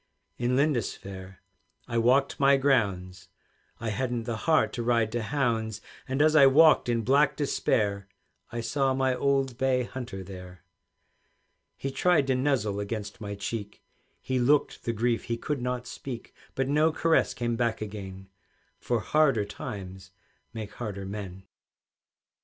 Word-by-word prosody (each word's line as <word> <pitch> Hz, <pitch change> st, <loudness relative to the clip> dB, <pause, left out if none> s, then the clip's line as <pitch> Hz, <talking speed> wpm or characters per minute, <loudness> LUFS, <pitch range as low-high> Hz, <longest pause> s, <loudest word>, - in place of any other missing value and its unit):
In 120 Hz, +1 st, +1 dB
Lindisfaire 100 Hz, -9 st, -2 dB, 0.4 s
I 115 Hz, -, 0 dB
walked 130 Hz, +4 st, +2 dB
my 140 Hz, 0 st, +5 dB
grounds, 100 Hz, -9 st, 0 dB, 0.5 s
I 115 Hz, -, -3 dB
hadn't 120 Hz, +1 st, -2 dB
the 115 Hz, 0 st, -3 dB
heart 155 Hz, -, +3 dB
to 120 Hz, -, -3 dB
ride 115 Hz, -2 st, +1 dB
to 120 Hz, +1 st, -2 dB
hounds; 115 Hz, -4 st, -1 dB, 0.3 s
And 135 Hz, +3 st, +1 dB
as 155 Hz, 0 st, +4 dB
I 140 Hz, -3 st, +8 dB
walked 150 Hz, -1 st, +5 dB
in 115 Hz, -1 st, +1 dB
black 140 Hz, +3 st, +3 dB
despair, 100 Hz, -8 st, 0 dB, 0.4 s
I 115 Hz, -, -3 dB
saw 135 Hz, +3 st, 0 dB
my 130 Hz, -1 st, +1 dB
old 135 Hz, -1 st, 0 dB
bay 130 Hz, -1 st, +2 dB
hunter 120 Hz, -6 st, -6 dB
there. 90 Hz, -1 st, -11 dB, 1.1 s
He 135 Hz, -, -4 dB
tried 160 Hz, 0 st, +3 dB
to 135 Hz, -, +1 dB
nuzzle 125 Hz, -7 st, 0 dB
against 105 Hz, 0 st, -5 dB
my 100 Hz, -1 st, -5 dB
cheek, 100 Hz, +1 st, -6 dB, 0.4 s
He 130 Hz, -1 st, -2 dB
looked 140 Hz, +4 st, +2 dB
the 115 Hz, -, +1 dB
grief 115 Hz, +1 st, 0 dB
he 115 Hz, -1 st, -2 dB
could 140 Hz, +2 st, -3 dB
not 125 Hz, 0 st, -2 dB
speak; 125 Hz, -1 st, -8 dB, 0.2 s
But 135 Hz, 0 st, 0 dB
no 150 Hz, +3 st, +3 dB
caress 165 Hz, +1 st, +2 dB
came 120 Hz, -1 st, -1 dB
back 115 Hz, -1 st, 0 dB
again, 95 Hz, -3 st, -7 dB, 0.5 s
For 120 Hz, -3 st, -1 dB
harder 135 Hz, -9 st, +2 dB
times 95 Hz, -4 st, -8 dB, 0.4 s
make 110 Hz, -2 st, -7 dB
harder 100 Hz, -5 st, -5 dB
men. 95 Hz, -2 st, -7 dB
120 Hz, 145 wpm, -27 LUFS, 105-135 Hz, 1.1 s, I